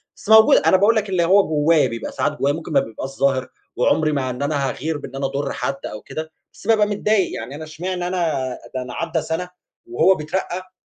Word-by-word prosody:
بس 200 - -12
موجودة، 220 0 +7
أنا 190 - +5
باقول 210 +4 +4
لك 210 -2 0
اللي 180 -2 +1
هو 195 +3 +4
جوايا، 155 0 +3
بيبقى 115 0 -5
ساعات 150 - -1
جوايا 140 +1 +2
ممكن 165 +1 -7
ما 140 - +5
بيبقاش 130 +1 -5
ظاهر، 135 -1 0 0.3
وعمري 155 +5 +2
ما 135 -3 -1
إن 125 +1 -5
أنا 140 -2 0
هاغِير، 155 +4 -3
بإن 135 -2 -9
أنا 135 - -2
أضر 140 +1 -2
حد 135 +2 -4
أو 105 - -6
كده، 160 0 -7 0.2
بس 200 - -14
بابقى 215 -2 +4
متضايق 205 -1 +1
يعني 125 +5 -7
أنا 155 - -7
إشمعنى 175 +3 -4
أنا؟ 155 -8 -1 0.2
ده 130 - -1
أنا 125 -1 -7
عدى 165 -1 -2
سنة 160 +3 -3 0.4
وهو 270 - +3
بيترقى 185 +3 -4
155 Hz, 215 wpm, -21 LUFS, 135-185 Hz, 0.4 s, موجودة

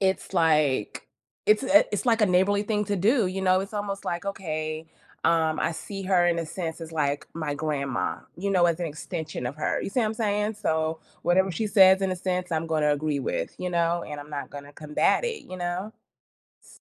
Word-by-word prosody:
it's 190 0 0
like 155 - +2 0.4
it's 210 +4 +4
a 285 +3 +6
it - - -2
it's 210 +4 -2
like 225 -2 +3
a - - +6
neighborly 190 +3 +3
thing 210 0 0
to 205 0 0
do, 220 +4 +3
you 190 +1 -3
know? 185 0 +4
It's 200 +3 -7
almost, 200 -1 -3
like, 175 +2 -3
okay, 155 -5 -4 0.4
um, 160 -1 +2
I 165 - +1
see 195 +4 -6
her, 185 -2 +3
in 170 -1 +2
a 165 - -2
sense, 165 0 -5
as 165 0 -8
like 145 -2 -1
my 155 -3 -2
grandma, 140 -10 -2 0.2
you 200 +3 -2
know, 180 -2 +4
as 170 0 0
an 170 - -1
extension 160 -2 -5
of 130 +4 -5
her, 155 - -1
you - - -4
see 250 - +1
what 220 - +2
I'm 215 - -2
saying? 210 -1 0
So, 160 -5 -1 0.2
whatever 190 +2 +3
she 215 +6 -1
says, 190 -1 +6
in 190 - +1
a 185 - -1
sense, 180 0 -2
I'm 160 +1 0
gonna 155 -2 +2
agree 145 -1 -1
with, - - -3
you 180 - -2
know, 170 0 +1
and 150 -1 -6
I'm 145 +1 -11
not 145 -1 -4
gonna 145 0 -9
combat 150 - +1
it, 465 -2 -3
you 185 - -8
know? 180 +4 -3 0.7
S - - -18
175 Hz, 225 wpm, -26 LUFS, 155-195 Hz, 0.7 s, a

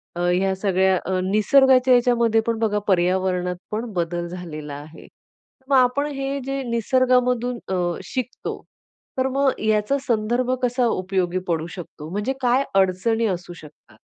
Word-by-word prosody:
अ, - - -5
ह्या 190 +1 +1
सगळ्या 190 -1 +2
अ, 185 0 0
निसर्गाच्या 255 +6 +4
याच्यामध्ये 235 -2 +3
पण 230 -1 0
बघा 210 -2 +1
पर्यावरणातपण 185 +3 0
बदल 175 -1 -2
झालेला 160 -4 -7
आहे. 150 +3 -12 0.6
मग 275 - +4
आपण 255 +3 +3
हे 275 +1 -3
जे 275 0 -2
निसर्गामधून 250 +1 +1
अ, 190 - 0 0.3
शिकतो 255 -1 -5 0.6
तर 260 0 +1
मग 275 0 +1
याचा 215 +5 +1
संदर्भ 240 +2 0
कसा 250 0 +1
उपयोगी 185 -3 -1
पडू 165 -1 -1
शकतो? 160 -4 -9
म्हणजे 205 +8 -2
काय 250 +2 +3
अडचणी 195 +4 +2
असू 180 -2 -4
शकतात? 150 -8 -16
215 Hz, 135 wpm, -22 LUFS, 180-250 Hz, 0.6 s, निसर्गाच्या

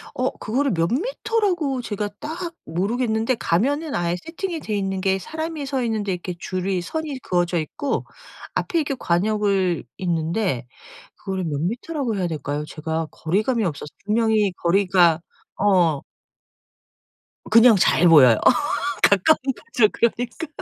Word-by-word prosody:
어. 255 +1 +1
그거를 265 +5 0
몇 165 0 +1
미터라고 370 - 0
제가 205 -2 -3
딱 335 +3 -5
모르겠는데 220 +7 0
가면은 280 - 0
아예 175 0 0
세팅이 335 0 -4
돼있는 195 -5 -2
게 190 0 +1
사람이 315 - -5
서 270 -2 -1
있는데 215 -4 -1
이렇게 180 0 -5
줄이 185 0 -2
선이 300 - -4
그어져 175 -5 0
있고 215 - -3 0.5
앞에 335 - 0
이렇게 280 -3 -1
과녁을 195 -1 +1
있는데 165 - -1 0.5
그거를 190 -2 -4
몇 145 -3 -2
미터라고 240 - -2
해야 180 - 0
될까요, 150 -2 -3
제가 160 +1 -3
거리감이 215 +8 0
없어서 150 -3 -4 0.2
분명히 215 -2 +2
거리가 175 -2 +4 0.4
어. 175 -8 +3 1.5
그냥 230 +1 +7
잘 180 -2 +4
보여요. 130 -9 +7 0.7
가까운 200 - +5 0.2
거죠, 240 -8 +1
그러니까. 240 +7 -1
205 Hz, 300 characters per minute, -22 LUFS, 175-265 Hz, 1.5 s, 그냥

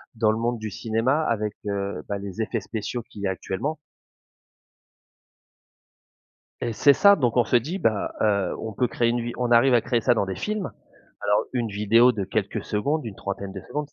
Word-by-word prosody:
dans 110 -1 +3
le 110 - -1
monde 120 0 -1
du 110 0 -4
cinéma 115 +9 0
avec, 105 -6 -1
heu, 100 -5 -3
bah, 100 - -2
les 100 +2 -5
effets 110 0 -2
spéciaux 110 +4 -4
qu'il 100 - -10
y - - +1
a 95 - +1
actuellement 95 +12 -3 2.8
et 115 - -2
c'est 140 +6 +5
ça, 200 +5 +6
donc 125 -7 0
on 120 - +4
se 120 - +1
dit: 155 - +1
«Bah, 110 - 0
heu, 100 -4 +2
on 110 -1 -5
peut 125 +4 +1
créer 120 - +1
une 120 0 0
vi 120 +1 -3
on 125 -1 -1
arrive 120 +2 +6
à 120 - +6
créer 120 +1 0
ça 125 - +4
dans 110 - 0
des 95 -1 -4
films, 210 -3 -3 0.5
alors 105 +1 +2
une 120 -3 0
vidéo 110 +4 +4
de 100 -3 -3
quelques 100 +1 -2
secondes, 140 +8 -1
une 100 - -7
trentaine 100 0 -5
de - - -7
secondes» 150 -1 -4
115 Hz, 205 wpm, -25 LUFS, 100-125 Hz, 2.8 s, ça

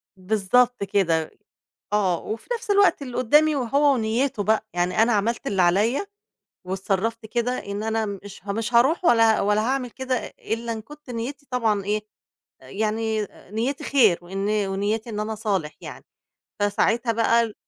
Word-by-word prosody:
بالضبط 220 +5 +1
كده، 170 -6 +1 0.6
آه 190 -5 +2
وفي 220 +1 -6
نَفْس 465 -2 -3
الوقت 400 -6 +4
اللي 250 -3 -6
قُدّامي 300 +5 +4
وهو 280 +3 +3
ونيّته 225 -1 0
بقى، 220 +1 +1
يعني 175 +4 +1
أنا 240 - +2
عملت 220 +3 0
اللي 195 -2 +1
عليّا 210 - +2 0.6
واتصرّفت 195 +4 -2
كده 235 +2 -1
إن 200 +1 -4
أنا 220 0 0 0.2
مش 200 -2 -11
ها 200 - -2
مش 225 +3 -3
هارُوح 275 +9 +4
ولا 225 -4 +5
ولا 210 +1 +2
هاعمل 255 +1 -1
كده 260 +2 -2 0.2
إلّا 230 +1 -3
إن 220 - -6
كنت 295 +4 -15
نيّتي 250 +5 -5
طبعًا 220 -5 0
إيه، 210 +1 0 0.6
يعني 220 0 -2 0.2
نيّتي 240 +6 -2
خير 225 -11 +4
وإن 195 +3 -3 0.2
ونيّتي 210 +4 -2
إن 210 - -3
أنا 215 +1 -2
أصالح 200 -8 -2
يعني، - - -9 0.6
فساعتها 230 +3 +1
بقى 230 +1 +3
ال 220 -2 -4
220 Hz, 155 wpm, -24 LUFS, 205-245 Hz, 0.6 s, ولا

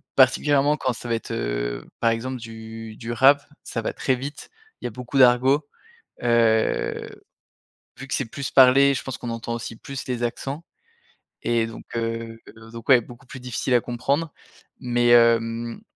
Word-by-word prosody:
particulièrement 145 +2 +4
quand 130 -2 -1
ça 120 - -9
va 115 - +2
être, 115 - -6
heu, - - -3
par 115 - +3
exemple 130 +3 -3
du 110 -1 -9
du 115 -1 -6
rap. 135 +4 +5 0.2
Ça 115 - -4
va - - -3
très 130 - 0
vite, 140 +3 -7 0.3
il - - -7
y - - +1
a - - -6
beaucoup 125 +4 -5
d'argot. 130 +4 +5 0.6
Heu, 115 -2 +2 0.9
vu 135 - -8
que - - -2
c'est 135 - -1
plus 135 +4 -5
parlé, 135 +1 +6
je - - -3
pense 130 -2 -6
qu'on 120 - -5
entend 115 0 -4
aussi 115 -1 -6
plus 135 +3 -7
les 125 -1 -2
accents 140 +6 -4 0.8
et 115 -1 +1
donc, 115 - -10
heu, 115 0 -3 0.3
donc 115 +3 -10
ouais, 125 -2 +7
beaucoup 120 +3 -14
plus 130 - -9
difficile 125 +1 -2
à 120 - +4
comprendre. 140 +6 -2 0.5
Mais, 120 -1 +1
hem, 115 0 +3
120 Hz, 175 wpm, -23 LUFS, 115-135 Hz, 0.9 s, ouais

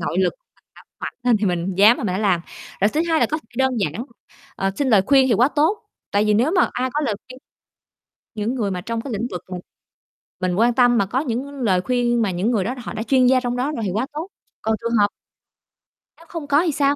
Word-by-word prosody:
nội 175 - -2
lực 190 - +2 0.2
mình - - -33
đã - - -16 0.2
mạnh - - -5
lên 245 -2 +3
thì 210 -1 -1
mình 180 +1 -1
dám 210 +5 +6
là - - -5
mình 185 - -1
hả - - -1
làm. 190 -5 +2 0.4
Rồi 205 - +4
thứ 305 - -1
2 320 -1 +2
là - - +4
có 310 - +1
thể - - -20
đơn 265 0 +2
giản, 195 - -2 0.5
ờ, 195 0 0
xin 280 -2 0
lời 205 -5 +5
khuyên 270 -2 +5
thì 230 - +3
quá 245 +6 +4
tốt, 315 +8 +1 0.3
tại 205 +1 +2
vì 210 -1 +3
nếu 245 +8 +3
mà 365 0 +3
ai 255 +1 -1
có 300 - +1
lời 270 -8 0
khuyên 255 0 -11 1.0
những 220 +4 -2
người 210 -6 -1
mà 180 -1 -3
trong 230 +3 -3
cái 255 -3 -6
lĩnh 230 +4 -2
vực 180 - -5
mình 180 -1 -5 0.8
mình 185 -1 -1
quan 235 +4 +3
tâm 245 -1 +4
mà 200 - +2
có 245 +7 -1
những 255 -2 -2 0.2
lời 185 -6 +2
khuyên 240 0 +1
mà 200 -4 +1
những 190 +7 0
người 205 -5 +1
đó 245 +6 -3
họ 235 - -7
đã 220 - -3
chuyên 255 +2 +3
gia 260 0 +5
trong 245 -1 -2
đó 260 +4 -1
rồi 235 -7 -4
thì 185 - -1
quá 225 +5 0
tốt. 315 +5 -4 0.3
Còn 220 0 0
trường 235 - -2
hợp 205 - +5 1.1
Nếu 335 - -18
không 330 -4 -6
có 290 +2 +4
thì 320 - +1
sao? 280 0 +2
235 Hz, 260 wpm, -21 LUFS, 200-265 Hz, 1.1 s, dám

